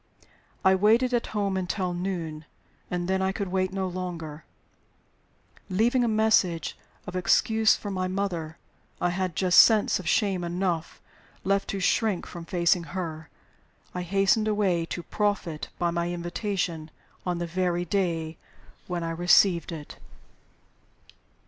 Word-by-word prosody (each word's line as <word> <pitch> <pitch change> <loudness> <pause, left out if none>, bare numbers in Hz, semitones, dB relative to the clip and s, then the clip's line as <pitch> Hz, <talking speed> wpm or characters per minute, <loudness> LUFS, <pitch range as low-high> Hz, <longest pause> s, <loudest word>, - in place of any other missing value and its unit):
I 190 - +7
waited 225 +6 +3
at 240 - +1
home 200 -2 -1
until 185 0 -2
noon, 170 -4 -4 0.4
and 175 -1 -2
then 190 0 +1
I 190 0 +1
could 200 -1 -4
wait 185 0 0
no 190 -1 -2
longer. 170 -4 -6 1.2
Leaving 235 +6 +2
a - - +2
message 215 -7 +2 0.3
of 185 -3 -7
excuse 220 +4 +3
for 205 - -6
my 185 -1 -1
mother 180 -4 -3 0.4
(I 175 - +1
had 185 -2 -2
just 180 0 +5
sense 220 -4 +5
of 175 -3 -3
shame 195 -4 +1
enough 175 -1 -2 0.4
left 195 +1 +1
to 200 - -3
shrink 200 0 +1
from 170 -2 -9
facing 170 0 +2
her), 160 -4 -5 0.6
I 180 - -3
hastened 195 +4 +2
away 190 -6 +1
to 175 - -5
profit 200 -7 -2
by 175 -1 0
my 170 0 -1
invitation 175 -2 -3 0.3
on 180 -1 -1
the 175 - -2
very 175 0 -1
day 165 -3 -1 0.5
when 175 -2 -3
I 165 - -2
received 175 +1 +4
it. 155 -3 -8
180 Hz, 140 wpm, -27 LUFS, 170-195 Hz, 1.2 s, I